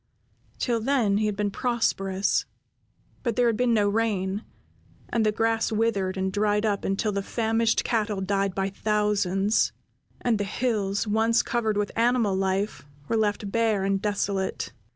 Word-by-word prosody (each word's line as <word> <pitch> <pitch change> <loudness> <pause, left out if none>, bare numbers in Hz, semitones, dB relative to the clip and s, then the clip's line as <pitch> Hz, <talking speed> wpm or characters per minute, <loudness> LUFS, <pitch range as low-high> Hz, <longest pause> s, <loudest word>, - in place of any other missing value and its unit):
Till 235 -2 0
then 225 -5 +2
he 215 - +1
had 210 - -1
been 205 0 -1
prosperous; 195 -5 0 0.8
but 235 -3 -1
there 245 - +3
had 230 -2 +3
been 245 +1 +1
no 205 -2 +3
rain, 205 -2 0 0.7
and 230 -2 +1
the 215 - +3
grass 225 +1 0
withered 210 -4 0
and 190 0 -1
dried 210 +1 +1
up 205 -2 0
until 195 +2 0
the 200 -1 -1
famished 225 +2 +1
cattle 215 -3 0
died 195 0 0
by 195 0 -1
thousands, 210 -1 +1 0.5
and 230 -4 +1
the - - +1
hills, 205 -2 -1
once 225 +2 +2
covered 220 -4 0
with 205 0 -1
animal 230 -4 +2
life, 195 +2 -1 0.3
were - - +1
left 210 -2 0
bare 220 -3 +1
and 195 0 0
desolate. 200 -2 -2
210 Hz, 155 wpm, -26 LUFS, 195-225 Hz, 0.8 s, there